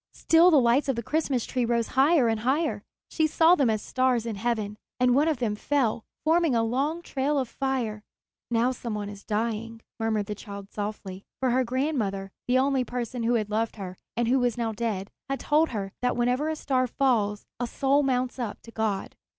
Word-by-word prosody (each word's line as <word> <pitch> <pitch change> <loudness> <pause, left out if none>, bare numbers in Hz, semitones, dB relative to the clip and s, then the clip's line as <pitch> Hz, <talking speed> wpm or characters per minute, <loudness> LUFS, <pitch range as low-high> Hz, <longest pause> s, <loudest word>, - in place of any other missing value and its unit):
Still 330 +2 +5
the 310 -5 +6
lights 250 +4 +3
of 270 - +2
the 235 - -3
Christmas 280 -3 0
tree 250 -2 -1
rose 235 -1 0
higher 275 0 +4
and 225 -1 +1
higher. 270 +8 0 0.3
She 315 -1 +2
saw 325 +2 +5
them 275 -9 +3
as 215 -1 0
stars 255 -3 +1
in 230 -2 -3
heaven, 215 -1 -2 0.2
and 250 0 +4
one 290 +5 +3
of 315 -3 +1
them 235 -4 -1
fell, 240 -2 0 0.2
forming 320 -3 +3
a 230 - +3
long 280 +9 -1
trail 280 +1 -1
of 265 -2 0
fire. 245 -5 -2 0.5
"Now 240 +2 +2
some 235 -3 -5
one 205 -1 -4
is 205 -1 -10
dying," 225 +1 -2 0.2
murmured 220 -2 0
the 210 - -4
child 200 -1 -9
softly; 205 -2 -5 0.2
for 260 -2 +1
her 255 +2 +3
grandmother, 235 -7 -1 0.2
the 250 +1 +3
only 265 0 +2
person 245 0 -4
who 235 +1 +2
had 215 -2 -1
loved 225 +1 0
her 190 -4 -7 0.2
and 240 -1 +1
who 260 +3 +3
was 245 -2 0
now 230 -2 -1
dead, 210 -3 -3 0.2
had 275 - -1
told 310 +2 +2
her 200 -4 -4
that 250 0 0
whenever 250 +5 +1
a 315 - -1
star 260 -4 0
falls 225 -6 +1
a 245 - -1
soul 275 +4 +2
mounts 255 -2 0
up 230 -4 -4
to 230 - -12
God. 220 -3 -2
240 Hz, 205 wpm, -27 LUFS, 220-270 Hz, 0.5 s, the